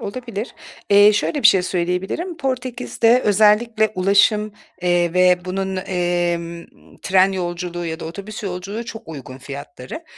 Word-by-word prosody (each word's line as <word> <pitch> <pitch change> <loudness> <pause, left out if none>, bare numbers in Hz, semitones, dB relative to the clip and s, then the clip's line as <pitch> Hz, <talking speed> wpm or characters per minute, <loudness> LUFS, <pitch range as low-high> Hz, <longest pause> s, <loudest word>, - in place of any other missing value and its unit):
Olabilir. 230 0 -6 0.4
Eee, 205 +1 +7
şöyle 285 +7 -1
bir - - +8
şey 190 -2 +4
söyleyebilirim. 185 - -2
Portekiz’de 250 -3 0
özellikle 215 +2 +3
ulaşım, 200 +3 +3 0.3
eee, 175 -1 +2
ve 180 0 +4
bunun, 190 +1 -3
emm, 175 -2 -2 0.4
tren 190 +1 +3
yolculuğu 175 -1 -4
ya 160 0 -5
da - - -6
otobüs 200 +6 -7
yolculuğu 195 +4 -5
çok 225 -6 -9
uygun 135 -4 -9
fiyatları. 140 - -9
190 Hz, 130 wpm, -20 LUFS, 175-215 Hz, 0.4 s, bir